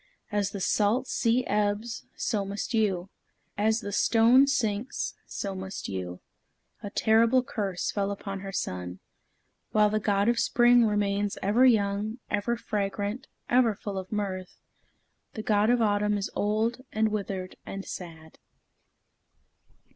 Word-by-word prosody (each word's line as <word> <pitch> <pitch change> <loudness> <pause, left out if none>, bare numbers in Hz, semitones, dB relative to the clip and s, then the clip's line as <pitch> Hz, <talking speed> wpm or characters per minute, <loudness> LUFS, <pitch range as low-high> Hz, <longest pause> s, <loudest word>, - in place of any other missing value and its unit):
As 205 -1 0
the 200 - -6
salt 215 +6 +2
sea 245 0 +1
ebbs, 210 +2 -1
so 210 -4 -1
must 200 +4 -4
you. 195 -5 0 0.4
As 220 +2 +1
the 205 - -5
stone 235 +6 +5
sinks, 230 -4 -1
so 200 -1 -4
must 190 0 -6
you." 90 -2 -5 0.6
The 205 - -5
terrible 230 +5 +3
curse 200 -8 -2
fell 200 -1 -1
upon 195 -1 -5
her 195 0 -6
son. 90 - -4 0.8
While 210 -1 +4
the 215 - +1
God 200 -1 +1
of 235 -1 +3
Spring 240 -1 +5
remains 205 -1 0
ever 225 +7 +5
young, 210 -1 +1
ever 210 +3 0
fragrant, 205 +2 -3 0.2
ever 240 -3 +3
full 200 -1 -5
of 185 0 -9
mirth, 190 -3 -3 0.8
the 215 - -4
God 210 0 +3
of 240 -1 +3
Autumn 210 0 +2
is 200 - -3
old, 220 +4 0
and 220 0 +1
withered, 195 -3 -4
and 195 0 -6
sad. 160 -3 -9
205 Hz, 140 wpm, -28 LUFS, 195-225 Hz, 0.8 s, stone